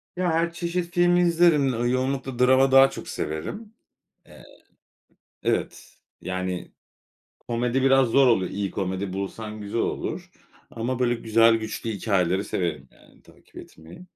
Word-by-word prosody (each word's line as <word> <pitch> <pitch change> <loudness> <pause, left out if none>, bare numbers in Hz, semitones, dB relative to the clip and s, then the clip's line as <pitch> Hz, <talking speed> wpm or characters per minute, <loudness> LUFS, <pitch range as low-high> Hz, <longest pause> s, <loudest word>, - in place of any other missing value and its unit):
Ya, 180 -2 0
her 170 +1 0
çeşit 170 0 -3
film 175 0 +3
izlerim. 170 -5 +3
Iıı, 120 +1 -1
yoğunlukla 130 0 -2
drama 130 +1 +4
daha 135 0 +7
çok - - -9
severim. 205 - -5 0.5
Eee - - -16 1.0
Evet. - - -3 0.2
Yani, 95 -1 -4 0.7
komedi 120 +2 -2
biraz 135 -2 +4
zor 135 +3 +4
oluyor. 95 -7 +2
İyi 100 -1 -3
komedi 95 0 -3
bulsan 105 +2 -6
güzel 105 +3 -3
olur. - - -4 0.4
Ama 120 +2 -3
böyle 120 -1 +1
güzel, 115 0 +3
güçlü 110 +1 -5
hikâyeleri 95 -2 0
severim, 85 -3 -3
yani, - - -23
takip - - -22
etmeyi. 80 - -13
120 Hz, 135 wpm, -24 LUFS, 100-135 Hz, 1.0 s, daha